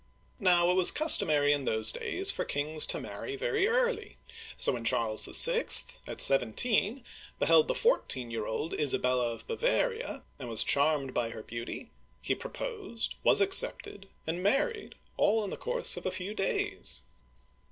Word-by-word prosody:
Now, 180 -2 +3
it - - +1
was 185 -1 +6
customary 150 - +4
in 145 -2 -3
those 110 0 +3
days 390 +2 -2
for - - -4
kings 150 +2 0
to - - -2
marry 410 - -7
very 430 -2 -1
early, 485 +1 -2 0.4
so - - +1
when 120 -3 -5
Charles 110 -1 +1
VI., - - +4 0.4
at - - -7
seventeen, 205 - +2 0.3
beheld 465 - +3
the - - -2
fourteen 135 - -1
year 115 -2 -5
old 150 +9 -4
Isabella 125 -4 +1
of 115 - -10
Bava'ria, 480 +1 -2 0.2
and 125 -3 -8
was 115 - +1
charmed 140 -2 +1
by 115 -1 -2
her 110 -1 -9
beauty, 115 +1 -8 0.3
he - - -2
proposed, 450 - -6
was 410 - +5
accepted, 390 - 0 0.2
and 165 +3 -4
married, 295 - -1
— - - -37
all 220 +1 +1
in 200 - -6
the - - -5
course 485 0 -2
of - - -5
a - - -2
few 185 +3 -5
days. 410 - -2
195 Hz, 165 wpm, -29 LUFS, -, 0.4 s, was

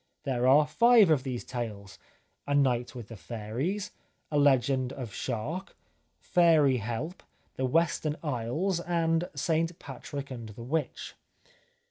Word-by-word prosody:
There 130 -3 0
are 145 +3 +6
five 225 +4 +5
of 150 -4 +4
these 130 -3 -4
tales, 105 -6 -6 0.2
" - - -44
A 145 - +1
Night 125 -3 +1
with 120 -4 -8
the 115 - -8
Fairies," 120 - -4 0.2
" - - -45
A 150 - +2
Legend 130 -2 +3
of 120 -6 -7
Shark," 135 - -4 0.3
" - - -44
Fairy 160 -7 +4
Help," 120 - -4 0.2
" - - -40
The 130 - 0
Western 155 +1 +1
Isles," 150 +7 -1
and 165 0 0
" - - -29
St 165 0 0
Patrick 140 +1 -7
and 115 -3 -7
the 110 +3 -9
Witch." 145 +1 -3
140 Hz, 155 wpm, -29 LUFS, 120-165 Hz, 0.3 s, are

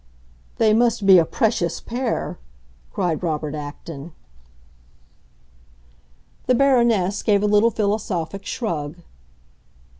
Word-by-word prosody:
"They 215 -1 +3
must 230 -2 +2
be 190 -2 +8
a 165 - +2
precious 210 -5 0
pair!" 245 +1 -3 0.5
cried 175 -6 -1
Robert 155 -3 -2
Acton. 150 +1 -8 2.3
The 255 - +4
Baroness 235 -7 +2
gave 205 -1 +2
a - - +2
little 210 +2 +4
philosophic 200 -4 -2
shrug. 160 - -4
200 Hz, 95 wpm, -22 LUFS, 165-225 Hz, 2.3 s, be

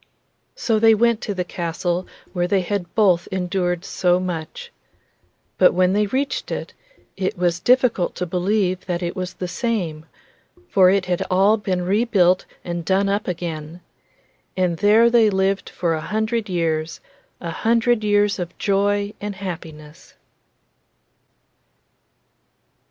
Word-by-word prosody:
So 225 - 0
they 225 0 +6
went 235 0 +2
to 205 - -3
the 180 - -1
castle 175 +1 -3 0.3
where 175 -1 0
they 190 +1 +2
had 180 -2 -4
both 185 -6 +3
endured 180 -1 -1
so 180 -1 +1
much. 170 -4 -5 0.9
But - - +5
when 185 +1 +3
they 210 +1 +2
reached 265 +5 -2
it, - - -5 0.4
it 190 -1 -2
was 175 -1 0
difficult 245 -5 +2
to 180 - -3
believe 185 +1 -1
that 175 -1 -2
it 175 - -3
was 185 0 -5
the 180 - -4
same, 175 -7 -3 0.6
for 185 -2 +5
it 195 0 +2
had 180 -1 -1
all 195 +4 +4
been 190 -4 -2
rebuilt 190 -2 +2 0.2
and 170 -1 -4
done 195 +3 +1
up 200 +2 -1
again. 165 -2 -5 0.8
And 180 -2 +1
there 215 +4 +5
they 230 -2 +5
lived 195 0 0
for 170 -2 -1
a 160 - -2
hundred 220 +3 -2
years, 165 -2 -1 0.4
a - - -5
hundred 230 0 +1
years 205 -1 +2
of 175 -1 -6
joy 205 +1 0
and 205 -1 -4
happiness. 165 -5 -9
185 Hz, 140 wpm, -21 LUFS, 175-205 Hz, 0.9 s, they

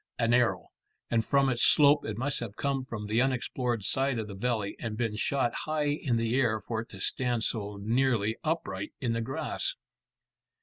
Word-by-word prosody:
An 115 0 +2
arrow, 120 -1 +2 0.4
and 115 -1 +3
from 140 +3 +3
its 120 -3 0
slope 145 -1 +5
it 105 -1 -4
must 135 +3 -1
have 110 -4 -6
come 140 -2 -1
from 115 -5 -6
the 110 +3 +2
unexplored 125 -3 -1
side 135 +5 +2
of 110 -2 -3
the 100 - -7
valley, 110 -1 -1
and 110 -2 -4
been 115 -3 -1
shot 125 +3 0
high 155 -1 -1
in 145 -5 0
the 115 0 0
air 120 -4 +2
for 110 +2 -3
it 115 - -11
to 95 - -10
stand 120 +3 -1
so 105 -3 -2
nearly 115 0 +1
upright 155 - -2
in 120 -3 0
the 115 - -1
grass. 135 +3 -2
120 Hz, 190 wpm, -29 LUFS, 110-135 Hz, 0.4 s, slope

